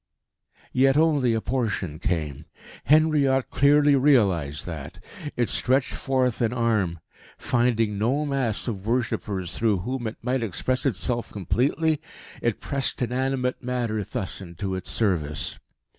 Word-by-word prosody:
Yet 135 +2 +4
only 145 -7 +3
a 110 - -1
portion 105 - -2
came. 80 -6 -2 0.4
Henriot 145 -3 +3
clearly 145 +1 +5
realised 100 - +2
that. 80 -5 -7 0.4
It 120 -2 +2
stretched 130 +1 +1
forth 130 -4 0
an 115 -1 +2
arm. 110 -8 0 0.4
Finding 115 -4 +1
no 135 +8 +1
mass 135 -7 0
of 100 -3 -4
worshippers 105 -7 -1
through 105 -5 +1
whom 125 +3 -3
it 110 - -6
might 125 +1 0
express 125 +6 -1
itself 120 +1 -2
completely, 140 - 0 0.4
it - - 0
pressed 140 -1 0
inanimate 125 +1 -1
matter 120 -4 -2
thus 95 +1 -4
into 95 +1 -5
its 95 -1 -4
service. 85 -9 -1
120 Hz, 130 wpm, -25 LUFS, 100-135 Hz, 0.4 s, clearly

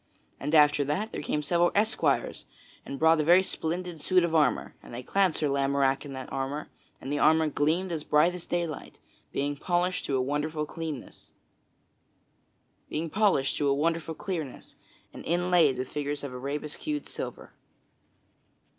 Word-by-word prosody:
And 150 +3 -1
after 150 -1 +6
that 190 +11 -2
there - - -4
came 150 0 -2
several 175 +3 +2
esquires 220 +4 +1 0.4
and 140 - -5
brought 160 +1 +4
a - - 0
very 175 +4 +6
splendid 175 -2 -3
suit 185 +2 +3
of 170 -1 -1
armor; 155 -2 +2
and - - -13
they 120 +2 -6
clad 190 +2 +2
Sir 150 - +1
Lamorack 140 -1 +1
in 140 - -7
that 130 0 -7
armor; 135 +3 -3 0.3
and 140 - -5
the 145 - 0
armor 160 0 +4
gleamed 160 +6 0
as 160 -3 -3
bright 155 +4 +3
as 180 -1 -8
daylight, 170 -3 -3 0.3
being 145 +1 -1
polished 175 +4 0
to 135 - 0
a - - +1
wonderful 150 +3 -2
clearness, 155 -3 -7 1.6
and 165 -2 +1 1.7
inlaid 175 -5 +3
with 130 0 -4
figures 145 0 -3
of 140 -3 -5
arabesqued 150 - -4
silver. - - -7
155 Hz, 140 wpm, -28 LUFS, 140-175 Hz, 1.7 s, after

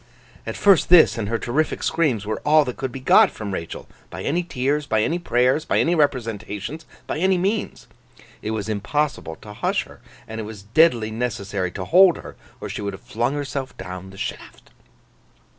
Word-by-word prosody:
At - - -4
first 200 -4 +4
this, 175 -2 +7
and 110 -4 -3
her 115 - 0
terrific 145 +7 -1
screams, 135 -11 +1
were 110 +1 -3
all 150 0 +5
that 125 - -4
could 130 -1 -3
be 135 - -7
got 130 - +6
from 105 -3 -6
Rachael, 85 -3 -6 0.2
by 95 +2 -7
any 170 +5 0
tears, 145 -2 -1
by 110 -3 +2
any 170 +7 0
prayers, 130 -1 +2
by - - 0
any 170 - +2
representations, 120 - -2 0.2
by - - -3
any 190 +1 +3
means. 200 +4 -2 0.6
It 105 - -4
was 110 -2 -3
impossible 110 - -2
to 105 - -9
hush - - 0
her; - - -16 0.3
and 110 0 -5
it - - -5
was 105 -2 -9
deadly 115 -1 +3
necessary 100 -5 -2
to 95 - -5
hold 180 - +6
her, - - -10 0.2
or - - -6
she - - -5
would 100 -1 -3
have 95 - -11
flung 120 +5 -1
herself 135 -2 -4
down 95 0 -7
the 95 - -13
shaft. - - -7
125 Hz, 190 wpm, -22 LUFS, 105-155 Hz, 0.6 s, this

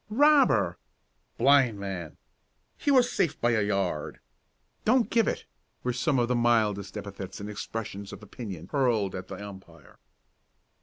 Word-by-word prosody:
"Robber!" 290 +5 +4 0.6
"Blind 135 -7 +4
man!" 95 -5 -6 0.6
"He - - -2
was 255 -3 +5
safe 165 - 0
by 120 - +2
a 110 -2 +2
yard!" 100 -7 -1 0.6
"Don't 240 +1 +3
give 230 -1 +3
it!" - - -2 0.4
were 125 - 0
some 130 +3 +1
of 120 -1 +2
the 125 - +1
mildest 110 -4 +1
epithets 100 -2 -7
and 100 - -6
expressions 105 -1 -6
of - - -10
opinion 95 -6 -8
hurled 120 -9 +1
at 90 0 -6
the 95 - -7
umpire. 95 -6 -12
105 Hz, 145 wpm, -28 LUFS, 100-130 Hz, 0.6 s, was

